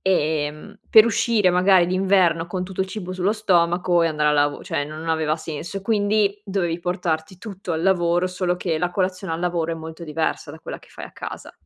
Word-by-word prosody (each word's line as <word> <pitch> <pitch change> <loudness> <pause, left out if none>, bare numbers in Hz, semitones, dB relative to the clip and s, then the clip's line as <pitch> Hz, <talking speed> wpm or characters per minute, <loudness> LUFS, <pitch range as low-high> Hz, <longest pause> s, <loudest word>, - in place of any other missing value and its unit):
ehm, 155 +2 -1
per 220 - +8
uscire 225 -3 +2
magari 180 0 +4
d'inverno 185 -3 +2
con 180 +1 -3
tutto 190 0 -6
il 190 - +1
cibo 190 -2 -6
sullo 185 +2 0
stomaco 175 -4 +2
e 165 - +3
andare 150 -1 +1
a - - +2
lavo 145 0 +1
cioè 145 - -2
non 155 +2 -7
aveva 155 -1 +1
senso. 165 +4 -6
Quindi 205 -1 +1
dovevi 180 -4 -1
portarti 175 -1 -2
tutto 195 -3 -6
al 160 0 -2
lavoro, 175 -1 +2
solo 180 -1 -1
che 165 -3 -2
la 175 +1 0
colazione 185 -1 -2
al 165 - -5
lavoro 170 -2 -1
è - - -2
molto 160 +1 -8
diversa 155 -1 -2
da 160 - -10
quella - - -7
che - - -21
fai - - -9
a - - -13
casa. - - -8
180 Hz, 205 wpm, -22 LUFS, 160-190 Hz, -, per